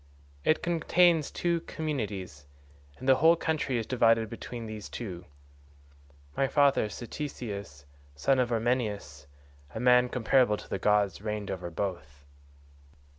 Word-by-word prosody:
It 155 - +2
contains 170 -1 +3
two 170 -1 0
communities, 105 - -5 0.5
and 130 - -8
the 130 -1 +6
whole 160 +5 +6
country 155 -6 -1
is 115 - -2
divided 115 -3 +2
between 115 0 -7
these 110 -1 -7
two. 90 -7 -7 1.1
My 135 - +2
father 140 -5 +3
Ctesius 105 - -7 0.3
son 130 - +2
of 125 -1 +1
Ormenus, 105 - -2 0.5
a - - -3
man 125 0 +5
comparable 125 -2 +2
to - - -11
the 95 - -3
gods, 100 -2 +2
reigned 105 -2 -4
over 90 -2 -5
both. 80 -7 -5
115 Hz, 125 wpm, -29 LUFS, 100-135 Hz, 1.1 s, the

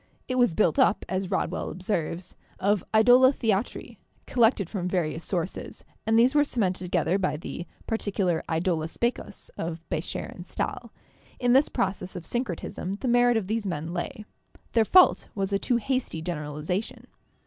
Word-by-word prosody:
It 255 0 -1
was 245 -9 +3
built 215 - +2
up, 260 -6 +3
as 185 0 -2
Rodwell 190 -2 -1
observes, 180 -1 -3 0.2
of 200 0 +2
'idola 245 +4 +7
theatri/ 225 -5 -2 0.3
collected 225 -6 +3
from 180 -2 -3
various 170 -3 -1
sources, 180 -1 -3 0.2
and 225 0 +4
these 245 +3 +5
were 295 -1 +5
cemented 190 -10 -1
together 175 +1 +1
by 185 -5 0
the 170 +2 -7 0.2
particular 195 -6 0
'idola 165 -1 0
specus' 235 +2 -3
of 165 0 -5
Becher - - -3
and - - -10
Stahl. - - -4 0.5
In 245 -1 +3
this 270 +3 +5
process 190 -1 -2
of 175 -2 -6
syncretism 195 -5 -3
the 210 +6 -4
merit 245 0 +4
of 215 - -1
these 215 +1 -2
men 165 -1 -3
lay; 185 +4 -4 0.5
their 225 -2 +3
fault 365 - +5
was 195 0 -1
a 195 - +2
too 245 - +1
hasty 255 -7 -2
generalization. 155 +4 -4
195 Hz, 160 wpm, -27 LUFS, 175-235 Hz, 0.5 s, idola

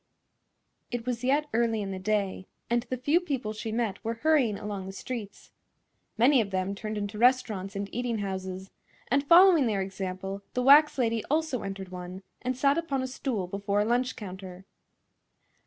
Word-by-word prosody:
It 240 -1 -4
was 250 -1 -3
yet 285 +4 +2
early 230 -1 +1
in 200 -2 -3
the 190 - -4
day, 195 -1 -1 0.2
and 240 0 +3
the 255 - -2
few 290 +7 +2
people 270 -11 -3
she 220 +1 -5
met 225 -3 -2
were 230 +1 -2
hurrying 260 -5 +2
along 200 -2 -5
the - - -5
streets. 210 -1 -7 0.7
Many 255 +2 +5
of 205 - -3
them 190 0 -1
turned 215 +1 -5
into 205 +1 -4
restaurants 225 -6 +2
and 200 0 -3
eating 240 -1 -1
houses, 190 -1 -5 0.4
and 280 +2 +2
following 340 -2 +7
their 200 -3 0
example 190 0 -5
the 250 - +1
wax 295 +3 +7
lady 230 -3 +1
also 310 -4 0
entered 195 -1 -6
one 180 +1 -8 0.2
and 255 0 -2
sat 280 +4 +3
upon 275 -6 -2
a - - -2
stool 255 -6 -3
before 200 +2 -1
a - - +1
lunch 245 +3 +1
counter. 190 -2 -9
220 Hz, 175 wpm, -28 LUFS, 195-255 Hz, 0.7 s, following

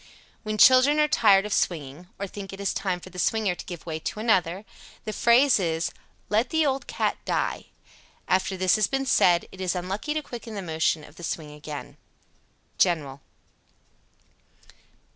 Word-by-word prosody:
When 215 -1 -4
children 260 +5 +6
are 300 - +4
tired 205 -8 +4
of 210 - -3
swinging, 155 0 -2
or 200 - -3
think 195 0 -8
it 195 - -9
is 200 - -1
time 185 -3 -2
for 185 - -12
the 180 - -8
swinger 215 -1 +1
to - - -9
give 175 -3 -8
way 160 -2 -4
to 210 - -5
another, 190 -3 +1 0.4
the 215 - -4
phrase 240 +4 +4
is 165 -2 -1 0.4
"let 225 +4 +1
the 320 -1 +2
old 270 -1 -1
cat - - -1
die." - - -2 0.6
After 190 +1 +1
this 185 +2 +3
has 215 - +2
been 270 0 -1
said, 175 -8 +3
it 190 - -10
is 185 0 -1
unlucky 195 - -3
to 310 - -2
quicken 235 -4 -8
the 200 - -4
motion 160 -2 0
of 150 - -16
the 175 - -11
swing 155 -2 -4
again. 150 -1 -9 0.8
_General. 150 -7 +1
190 Hz, 175 wpm, -25 LUFS, 170-220 Hz, 0.8 s, children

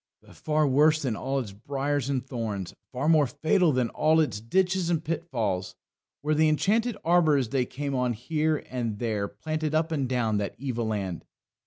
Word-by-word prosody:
But - - -17
far 155 0 +1
worse 150 +3 +4
than 125 -5 -1
all 135 +8 -2
its 120 -7 -3
briars 140 +5 -2
and 130 -3 -1
thorns, 110 -8 -4 0.2
far 135 +3 -2
more 155 -3 +5
fatal 160 +5 +2
than 125 -3 +1
all 160 +1 +3
its 150 -9 +1
ditches 185 +8 +1
and 165 -2 0
pitfalls, 120 - -2 0.5
were 155 +1 +1
the 155 +1 +4
enchanted 215 +8 +1
arbours 155 -7 +3
they 125 -1 0
came 140 +1 -4
on 125 -2 +1
here 155 +6 -1
and 115 -4 -2
there 105 -3 -1
planted 155 +4 -3
up 160 +1 +1
and 140 -5 -1
down 115 -5 +1
that 100 - -3
evil 120 -3 -3
land. 95 -6 -3
140 Hz, 180 wpm, -27 LUFS, 115-155 Hz, 0.5 s, more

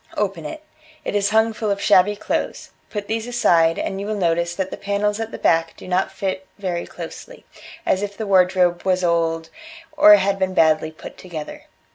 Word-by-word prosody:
Open 195 -6 -2
it. 310 - -8 0.4
It - - -3
is 200 -1 +2
hung 220 +1 +3
full 215 -1 -3
of 200 0 0
shabby 200 0 +4
clothes; 205 - -3 0.2
put 205 -1 -5
these 225 +1 -2
aside, 170 -9 +3
and 195 0 -3
you 200 - -5
will 215 - -2
notice 170 -2 0
that 190 0 -3
the - - -4
panels 205 +1 -1
at 225 0 -3
the - - -7
back 165 0 +1
do - - -11
not 185 +1 0
fit 190 -1 -4
very 180 -4 -3
closely, - - -10 0.4
as 190 - +1
if 205 0 -5
the 220 - -3
wardrobe 180 -2 +3
was 185 -1 +1
old 165 -1 0 0.4
or 310 +1 +8
had 195 -8 0
been 190 -1 -1
badly 155 -1 +3
put 155 - -12
together. 165 -5 -8
190 Hz, 195 wpm, -21 LUFS, 175-210 Hz, 0.4 s, or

